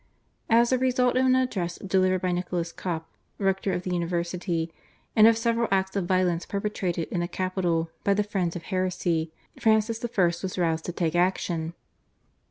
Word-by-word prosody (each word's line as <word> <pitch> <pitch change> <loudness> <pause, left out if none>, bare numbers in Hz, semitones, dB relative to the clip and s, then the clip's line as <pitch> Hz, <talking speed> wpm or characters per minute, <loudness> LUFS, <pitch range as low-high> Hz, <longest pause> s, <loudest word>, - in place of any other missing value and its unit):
As 235 +1 +5
a 255 - +3
result 250 -1 +2
of 260 +1 +3
an 255 - +5
address 195 -10 -1
delivered 185 -1 +1
by 180 - +1
Nicholas 175 -1 -2
Cop, 165 -3 -4 0.3
rector 195 0 0
of 180 - -2
the 180 - -2
university, 170 -1 -2 0.4
and 220 0 +8
of 225 -1 +5
several 230 0 +1
acts 190 0 0
of 190 -3 -1
violence 180 -2 +1
perpetrated 195 -5 -2
in 180 - -1
the 175 - -1
capital 175 -3 -1
by 200 - +3
the 210 - +2
friends 185 -4 -2
of 170 - -5
heresy 180 -3 -1 0.3
Francis 220 0 +2
I. 215 -6 +2 0.2
was 190 -1 -4
roused 165 -2 0
to - - -2
take 165 -2 -1
action. 175 -2 0
185 Hz, 175 wpm, -26 LUFS, 175-210 Hz, 0.4 s, and